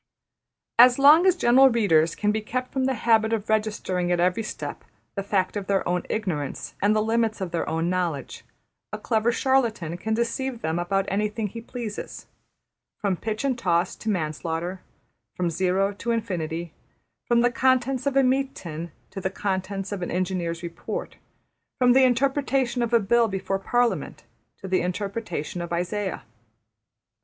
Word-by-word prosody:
As 245 +1 +8
long 300 +6 +7
as 370 - +5
general 265 -3 +6
readers 170 -9 +3
can 210 0 +1
be 215 +1 -1
kept 255 +4 -4
from 265 -1 0
the 265 0 +1
habit 225 -1 +3
of 215 -1 -2
registering 210 -5 0
at 175 - +2
every 180 +5 +2
step 225 +4 -6 0.3
the 200 - -3
fact 195 -1 0
of 200 -2 -4
their 195 -1 +1
own 180 0 +1
ignorance 170 -10 -3
and 205 +2 +3
the 215 - +2
limits 225 0 0
of 185 -3 -4
their 170 - -2
own 165 +1 -1
knowledge, 175 -7 -2 0.5
a 215 - -4
clever 220 +1 +1
charlatan 235 - +1
can 220 +4 -1
deceive 235 +1 -2
them 160 +2 -1
about 195 +3 0
anything 210 +2 -1
he 230 +3 -6
pleases: 230 -3 -7 0.8
``from 195 -4 0
pitch 220 +2 -3
and 260 -3 0
toss 175 -2 +1
to 220 - -4
manslaughter''; 170 0 -2 0.6
from 175 -2 -1
Zero 190 +3 +1
to 230 +4 -6
Infinity; 170 -8 -2 0.5
from 235 -1 +4
the 245 0 +3
contents 260 +1 +1
of 275 -1 +1
a 275 - +6
meat 265 +1 +1
tin 165 0 -7 0.2
to 195 - -6
the 190 - -1
contents 195 0 -3
of 200 -2 -4
an 175 - -3
engineer's 175 -2 -2
report; 170 0 -6 0.6
from 250 -2 +5
the 265 +1 +6
interpretation 265 -1 +1
of 235 -1 -1
a 235 - +5
bill 230 +3 +3
before 195 -1 -2
Parliament 240 +4 0 0.3
to 190 - -8
the 185 0 +1
interpretation 180 -3 -3
of 170 - -6
Isaiah. 180 - -2
205 Hz, 165 wpm, -25 LUFS, 180-235 Hz, 0.8 s, As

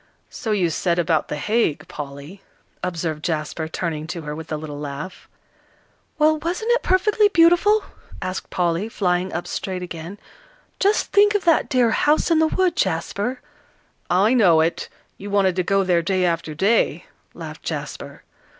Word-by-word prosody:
"So 220 - -4
you 185 -5 +1
said 170 +2 0
about 165 -2 +1
The - - -3
Hague, 210 0 0
Polly," 145 +6 -8 0.4
observed 165 -4 -3
Jasper, 155 -1 -2
turning 160 -2 -4
to 170 -1 -5
her 150 0 -5
with 160 0 -9
a 155 - -1
little 150 -1 -7
laugh. 145 +5 -7 0.9
"Well, 310 0 +3
wasn't 355 +9 -2
it - - +3
perfectly 415 +3 +3
beautiful?" 370 +4 +4 0.4
asked 185 0 -5
Polly, 175 +4 -1
flying 180 -3 0
up 175 - -4
straight 185 -2 -4
again. 175 +2 -7 0.6
"Just 410 +2 +1
think 415 +1 +5
of 415 - +1
that 330 -2 +3
dear 245 -3 +3
'House 300 +7 +2
in 325 - +4
the 320 - +4
Wood,' 370 +2 +1
Jasper." 200 +9 -1 0.7
"I 195 +7 +3
know 185 -10 +5
it; 165 +1 -1 0.3
you 200 - -7
wanted 195 -3 +2
to - - +3
go 195 +2 +1
there 180 -2 +2
day 185 +1 0
after 165 -3 -2
day," 200 +8 +1 0.3
laughed - - -8
Jasper. - - -6
185 Hz, 160 wpm, -22 LUFS, 165-265 Hz, 0.9 s, think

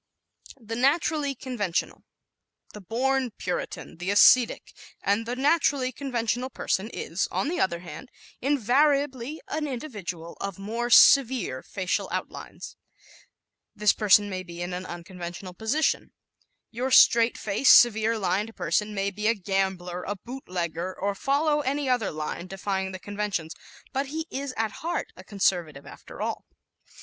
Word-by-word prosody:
The 225 -1 -6
Naturally 285 +2 +1
Conventional 220 -9 -2
¶ - - -34 0.7
The 210 - -9
"born 255 +6 0
Puritan," 180 - -5
the 180 +2 -4
ascetic, 230 +4 +5 0.3
and 210 +3 0
the 245 - -2
naturally 280 -2 +2
conventional 245 -1 -2
person 215 -4 -2
is, 170 +4 -2
on 280 - -1
the 350 - -2
other 170 -2 0
hand, 180 - -10 0.3
invariably 280 +1 +1
an 305 0 -2
individual 205 - -6
of 195 -3 -4
more 230 +5 -3
severe 245 - +5
facial 185 -2 -2
outlines. - - -6 1.0
This 210 0 +3
person 205 -1 +4
may 185 -2 -4
be 175 -1 -7
in 175 +1 -5
an 180 +1 -5
unconventional 175 +1 -8
position; 225 - 0 0.6
your 250 +3 -2
straight 235 -2 +6
faced, 215 +6 +6
severe 225 -1 +2
lined 210 +2 -1
person 210 0 -1
may 195 0 -1
be 210 +2 -2
a 230 - +3
gambler, 190 -2 -2
a 205 - -2
boot 250 +7 -9
legger, 175 0 -3
or 200 +1 0
follow 295 +7 +1
any 285 +1 -1
other 245 -5 +1
line 155 +3 -5
defying 190 0 -3
the 185 - -6
conventions; 200 -4 -3 0.4
but 270 +1 -1
he 315 +3 -4
is 275 0 -4
at 220 -1 0
heart 340 +2 -3
a - - -12
conservative 175 -8 -1
after - - -9
all. - - -4
215 Hz, 145 wpm, -26 LUFS, 185-265 Hz, 1.0 s, straight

